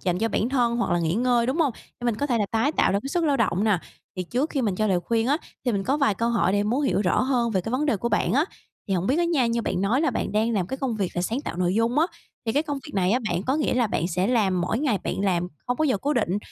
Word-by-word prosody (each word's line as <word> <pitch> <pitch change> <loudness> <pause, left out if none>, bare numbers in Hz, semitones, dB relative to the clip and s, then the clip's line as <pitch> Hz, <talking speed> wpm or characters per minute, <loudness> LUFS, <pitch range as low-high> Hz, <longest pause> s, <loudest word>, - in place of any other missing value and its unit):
dành 180 -1 0
cho 225 +1 +1
bản 225 +2 0
thân 240 -3 +1
hoặc 235 - -1
là 175 - +2
nghỉ 165 +1 0
ngơi, 240 0 +2
đúng 265 +5 0
hông? 310 -6 +2 0.3
Để 240 - -7
mình 235 -3 +1
có 285 - -1
thể 240 -4 +1
là 205 - +1
tái 230 +7 +1
tạo - - +2
lại 200 - +1
cái 275 - -5
sức 335 +3 0
lao 285 -2 +2
động 210 -4 +1
nà. 205 -6 +2 0.4
Thì 185 - -1
trước 250 - -1
khi 270 -4 -1
mình 205 -4 0
cho 215 - +1
lời 185 -4 +2
khuyên 230 +4 0
á, 285 - +3 0.3
thì 245 - +1
mình 195 -2 -1
có 275 +4 +1
vài 275 -8 +2
câu 230 +4 0
hỏi 190 -6 +2
để 205 0 +2
muốn 245 +8 0
hiểu 265 - +1
rõ 185 - +2
hơn 250 -3 +1
về 190 -4 +1
cái 225 - -5
vấn 280 +4 0
đề 230 - +2
của 235 +5 -2
bạn 185 - +1
á. 285 +5 +3 0.4
Thì 195 - +1
hổng 180 +1 -1
biết 280 +6 +2
á 345 - +3
nha, 300 -8 +2
như 230 0 0
bạn - - -1
nói 215 +8 +2
là 305 -4 +2
bạn 220 - -3
đang 220 +2 +1
làm 195 -5 0
cái 265 - -4
công 255 -5 -2
việc 195 -3 -1
là 175 - 0
sáng 230 +9 -1
tạo 170 - -6
nội 180 +1 +1
dung 230 +5 +1
á, 325 - +4 0.4
thì 225 - +1
cái 290 +5 +2
công 290 -3 -3
việc 295 - -10
này 185 -1 +2
á 250 - +3
bạn 175 +2 -1
có 265 +6 0
nghĩa 300 - 0
là 245 -2 +2
bạn 170 -3 -1
sẽ 180 +2 0
làm 205 -6 +2
mỗi 180 +6 -1
ngày 260 -8 +1
bạn - - -1
làm 180 -3 +1 0.2
không 245 - 0
có 310 - +1
giờ 260 -7 +2
cố 290 +8 0
định, 205 -5 +1
230 Hz, 335 wpm, -25 LUFS, 195-265 Hz, 0.4 s, á